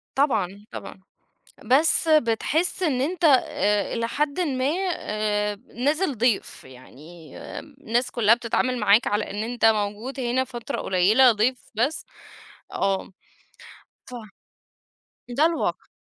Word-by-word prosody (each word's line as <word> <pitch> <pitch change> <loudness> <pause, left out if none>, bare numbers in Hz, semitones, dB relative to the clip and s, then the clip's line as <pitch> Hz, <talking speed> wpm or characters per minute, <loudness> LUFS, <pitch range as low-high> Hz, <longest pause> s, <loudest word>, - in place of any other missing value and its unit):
طبعًا، 205 -8 0
طبعًا، - - -9 0.6
بس 300 +7 +4
بتحس 310 +6 +1
إن 280 -7 +1
أنت 340 +5 -2
إ 210 -7 +2
إلى 230 -1 -2
حدٍ 295 +6 -2
ما، 265 -6 -1 0.3
آآ، 210 -2 -2 0.2
نازل 290 +3 0
ضيف، 235 -2 0
يعني 150 +5 -14 0.2
الناس 260 -4 -3
كلّها 230 -1 +4
بتتعامل 245 +1 -1
معاك 210 +2 +4
على 205 +1 -1
إن 205 +2 -3
أنت 240 0 -3
موجود 220 +4 0
هنا 250 +1 0
فترة 250 +1 -6
قليلة، 215 +7 +4
ضيف 240 +4 -1
بس. 275 +8 -1 0.7
آه. 195 -1 -1 1.0
ف 250 - -10 1.1
ده 280 +6 +2
الواقع. 335 -1 -2
240 Hz, 115 wpm, -24 LUFS, 210-275 Hz, 1.1 s, بس